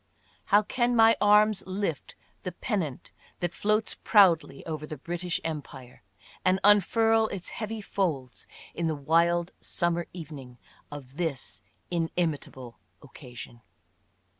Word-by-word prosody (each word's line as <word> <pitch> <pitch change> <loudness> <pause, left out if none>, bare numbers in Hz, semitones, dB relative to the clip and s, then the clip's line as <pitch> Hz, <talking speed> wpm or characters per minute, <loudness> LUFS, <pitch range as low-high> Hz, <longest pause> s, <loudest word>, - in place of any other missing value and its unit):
How 205 +1 +4
can 245 +2 0
my 225 0 +6
arms 210 0 +5
lift 190 -5 -3 0.3
the 180 - -4
pennant 175 - -3 0.3
that 175 -1 -2
floats 215 +1 0
proudly 170 -9 +4
over 155 -2 -5
the 155 - -7
British 175 +4 -3
Empire, 140 -5 -7 0.4
and 185 +1 +3
unfurl 220 +2 +4
its 195 -4 -6
heavy 220 0 -5
folds 155 - -3 0.3
in 170 -1 -2
the 160 - -1
wild 170 +4 +2
summer 170 -1 -1
evening 145 -7 -9 0.3
of 140 -1 -10
this 160 -7 -3 0.3
inimitable 160 -7 -3 0.2
occasion 125 -3 -11
170 Hz, 115 wpm, -28 LUFS, 145-205 Hz, 0.4 s, my